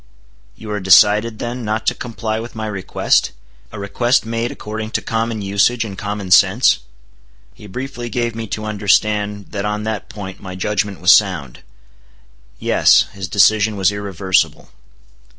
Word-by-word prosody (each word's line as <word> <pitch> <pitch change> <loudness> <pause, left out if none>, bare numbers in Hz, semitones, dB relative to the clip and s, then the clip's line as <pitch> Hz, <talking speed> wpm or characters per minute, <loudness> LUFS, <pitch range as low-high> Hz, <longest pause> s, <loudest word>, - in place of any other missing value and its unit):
"You 110 -1 -9
are 105 - -2
decided, 105 +4 +4
then, 120 +2 -5
not 110 +1 -2
to - - +2
comply 110 -2 -4
with 115 +1 -8
my 110 0 -4
request—a 60 - -2
request 120 +5 0
made 115 +1 -2
according 110 +1 -6
to - - -7
common 115 -1 -2
usage 100 +4 +1
and 100 -3 -7
common 100 -1 -5
sense?" - - +5 0.7
He 105 - -14
briefly 120 +3 -6
gave 120 0 -2
me 115 0 -6
to 110 +1 -5
understand 105 -1 0
that 100 -1 -3
on 105 0 -2
that 110 -2 -4
point 95 -3 -8
my 95 -1 -8
judgment 100 -1 -2
was 90 +2 +6
sound. 90 - +1 1.0
Yes: - - +4
his 95 -2 -6
decision 105 +3 +3
was 95 -1 +2
irreversible. 95 -5 -1
105 Hz, 150 wpm, -18 LUFS, 95-110 Hz, 1.0 s, was